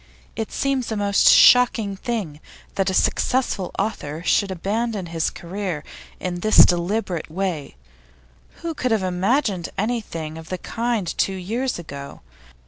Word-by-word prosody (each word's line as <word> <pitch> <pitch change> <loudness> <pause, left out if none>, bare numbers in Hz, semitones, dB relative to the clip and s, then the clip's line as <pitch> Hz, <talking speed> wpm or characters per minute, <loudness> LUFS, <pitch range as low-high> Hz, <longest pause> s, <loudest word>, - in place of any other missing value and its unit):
It 225 - -4
seems 270 -4 -1
a 220 - -1
most 200 -1 +4
shocking 235 -5 +6
thing 195 - -4 0.3
that 195 -1 0
a - - -1
successful 240 -7 +1
author 170 -7 -3
should 200 - +2
abandon 205 +3 -2
his 165 -1 -1
career 180 -3 -5 0.4
in 175 -1 -3
this 215 +4 +7
deliberate 175 0 -1
way; 170 - -3 0.9
who 335 -1 -2
could 255 -4 -2
have 220 -4 +1
imagined 185 - 0
anything 190 -8 -3
of 160 -1 -12
the 185 - -3
kind 230 0 -2
two 195 - +1
years 230 +8 -2
ago? 140 -4 -9
195 Hz, 135 wpm, -22 LUFS, 175-225 Hz, 0.9 s, this